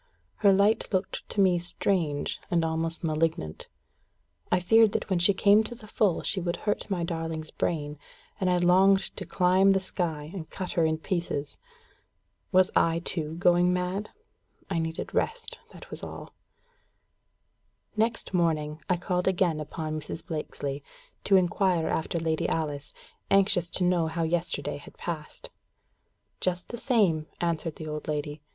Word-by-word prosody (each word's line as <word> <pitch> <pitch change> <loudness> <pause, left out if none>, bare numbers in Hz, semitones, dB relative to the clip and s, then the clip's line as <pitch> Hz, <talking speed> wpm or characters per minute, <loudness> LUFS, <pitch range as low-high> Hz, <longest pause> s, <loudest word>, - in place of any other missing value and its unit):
Her 200 - +5
light 200 +3 +3
looked 185 -1 -2
to - - -4
me 180 -2 +4
strange, 170 -4 -1
and 170 -2 +2
almost 160 +1 -2
malignant. 155 - -1 0.8
I 180 - +4
feared 220 +4 +5
that - - -2
when 185 - +3
she 175 +4 +6
came 205 +2 +5
to 240 - -6
the 230 -2 -2
full 205 -4 +1
she 190 - -1
would 175 0 -1
hurt 210 - -1
my 180 -4 -1
darling's 165 -2 -4
brain, 150 -3 -2 0.4
and 185 - +1
I 180 - +3
longed 190 +2 +4
to - - -6
climb 190 +1 +4
the 195 - +2
sky, 160 -5 -3
and 170 -5 -7
cut 185 -2 -5
her 165 - +2
in 160 0 +1
pieces. 165 -4 -3 0.9
Was 185 -1 +4
I 165 0 +3
too 160 -2 -2
going 175 +1 +4
mad? 180 +3 -2 0.6
I 170 - +1
needed 160 0 -4
rest, 455 0 -2
that - - -13
was - - -7
all. - - -8 1.6
Next 225 -1 -1
morning, 155 -3 0
I 180 - +3
called 180 +1 -1
again 175 -4 +2
upon 155 +1 -4
Mrs. 155 - -7
Blakesley, 145 -4 -4 0.4
to 195 - +5
inquire 180 -2 +2
after 160 +1 -1
Lady 160 -1 0
Alice, 145 -3 -2 0.4
anxious 195 -3 +3
to 185 - -1
know 175 -2 +2
how 165 +1 -2
yesterday 170 +1 -1
had 145 - -14
passed. 170 - -6 0.9
"Just 180 -1 -1
the 235 - -5
same," 200 - +2
answered 165 -2 -1
the 155 - -8
old 150 0 -5
lady. 150 0 -3
175 Hz, 155 wpm, -28 LUFS, 160-190 Hz, 1.6 s, she